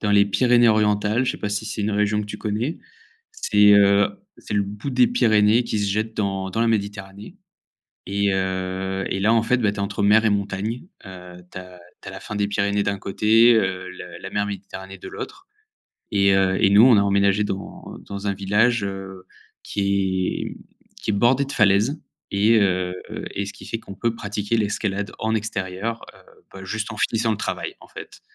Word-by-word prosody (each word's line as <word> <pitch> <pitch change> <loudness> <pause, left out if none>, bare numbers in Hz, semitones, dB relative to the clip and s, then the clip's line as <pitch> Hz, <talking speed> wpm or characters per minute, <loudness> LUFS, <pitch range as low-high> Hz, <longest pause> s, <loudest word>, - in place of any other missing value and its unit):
dans 105 - -1
les 100 0 +5
Pyrénées 120 +3 +3
orientales, 105 +2 +2
je - - 0
sais - - -8
pas 105 - -4
si 105 +1 -2
c'est 105 0 -4
une 105 - -1
région 105 +1 +1
que 105 - -5
tu 105 - -7
connais, 110 +8 -3 0.5
c'est 105 - +4
heu, 100 0 +5 0.3
c'est - - -6
le 100 - +2
bout 105 +7 -6
des 245 - +4
Pyrénées 110 - +3
qui 110 - -2
se 100 -1 0
jette 110 +2 -2
dans 95 -2 -2
dans 110 - -2
la 115 - +3
Méditerranée 100 - -4 0.7
et 100 0 0
heu 95 0 -2
et 95 - -2
là, 110 +3 +3
en 115 -1 +3
fait, 125 +3 +2
bah, 105 -4 +1
tu 105 - -10
es - - -4
entre 100 +1 -2
mer 110 +2 +5
et - - +4
montagne, 100 - -2 0.2
heu, 90 -1 -11
tu - - -8
as 90 -1 -13 0.2
tu - - -13
as - - -8
la - - -8
fin 105 - -7
des 100 0 0
Pyrénées 100 0 0
d'un 100 0 -1
côté, 110 +5 +4
heu, 95 -3 -1
le 90 -1 -10
la - - -7
mer 105 0 -1
Méditerranée 95 -1 -8
de - - -10
l'autre 385 -3 -9 0.6
et 100 -1 +3
heu 95 -1 +2
et 100 - +6
nous, 105 +3 +7
on 120 -5 +7
a - - +5
emménagé 100 +1 +2
dans 100 -1 -6 0.2
dans 100 0 -6
un 100 - +1
village, 105 +4 +1
heu, 95 -1 -6 0.4
qui 100 -2 0 0.2
est, - - -4
mmh, - - -10 0.4
qui - - -3
est - - -1
bordé 120 +7 +3
de 140 - -7
falaises 105 +5 +2 0.3
et 105 +3 +4
heu 90 -2 0 0.4
et 100 - -2
ce 100 - -7
qui - - -13
fait 115 - -3
qu'on 100 - -10
peut 115 +4 -1
pratiquer 105 0 -2
l'escalade 105 -1 -2
en 110 0 -1
extérieur, 105 +1 -4
heu, - - -18 0.3
bah, 95 - -9
juste 110 +4 -4
en - - -10
finissant 115 +1 +1
le 105 - -2
travail, - - -4
en - - -15
fait, - - -11
100 Hz, 210 wpm, -22 LUFS, 95-110 Hz, 0.7 s, nous